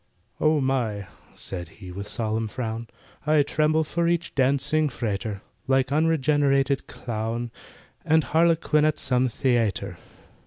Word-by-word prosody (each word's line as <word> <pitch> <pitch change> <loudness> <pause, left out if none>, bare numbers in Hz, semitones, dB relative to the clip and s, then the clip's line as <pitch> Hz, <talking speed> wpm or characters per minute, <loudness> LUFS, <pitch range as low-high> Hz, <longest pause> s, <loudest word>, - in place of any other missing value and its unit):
"Oh 155 0 +3
my," 120 -7 0 0.3
said 90 -3 -5
he, 95 -4 -9
with 100 +3 -6
solemn 110 0 -1
frown, 115 0 -4 0.4
"I 155 -1 +5
tremble 155 +2 +2
for 170 +2 -1
each 170 0 0
dancing 140 +3 +2
frater, 105 -4 -3 0.2
Like 135 0 +2
unregenerated 145 -3 +2
clown 115 +1 -4 0.5
And 160 -1 +3
harlequin 160 -2 +3
at 155 0 +2
some 130 -1 +1 0.2
the 125 -2 +4
ayter." 100 -4 -2
135 Hz, 125 wpm, -25 LUFS, 110-155 Hz, 0.5 s, I